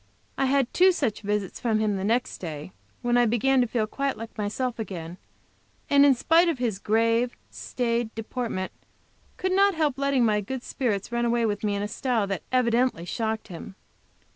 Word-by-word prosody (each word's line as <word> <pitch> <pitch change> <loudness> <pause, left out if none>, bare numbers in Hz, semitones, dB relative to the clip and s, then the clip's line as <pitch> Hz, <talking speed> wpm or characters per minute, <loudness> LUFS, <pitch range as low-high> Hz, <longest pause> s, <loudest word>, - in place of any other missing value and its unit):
I 270 - +1
had 265 -1 +1
two 370 +1 +6
such 250 - -1
visits 205 -2 -2
from 225 -3 +1
him 215 -1 +1
the 190 - -3
next 235 +4 0
day, 155 -1 -6 0.3
when 240 0 +2
I 240 - +4
began 255 +4 +3
to 245 - +1
feel 225 -1 0
quite 275 +5 -2
like 225 +1 -8
myself 230 +4 -2
again, 175 -5 -6 0.7
and 280 0 +7
in 280 -2 +6
spite 330 +7 +4
of 325 - -1
his 230 -6 -1
grave, 230 +3 +1
staid 235 -2 -2
deportment, 225 -4 -3 0.7
could 375 - -1
not 395 0 +4
help 295 -4 0
letting 275 -3 +2
my 210 -1 +2
good 255 +5 -5
spirits 225 -6 -2
run 235 0 0
away 235 0 +2
with 205 -1 -2
me 205 -1 0
in 200 - -2
a - - -1
style 230 -1 0
that 195 -1 -3
evidently 245 -6 +2
shocked 220 +3 -3
him. 180 +2 -9
235 Hz, 190 wpm, -26 LUFS, 210-260 Hz, 0.7 s, and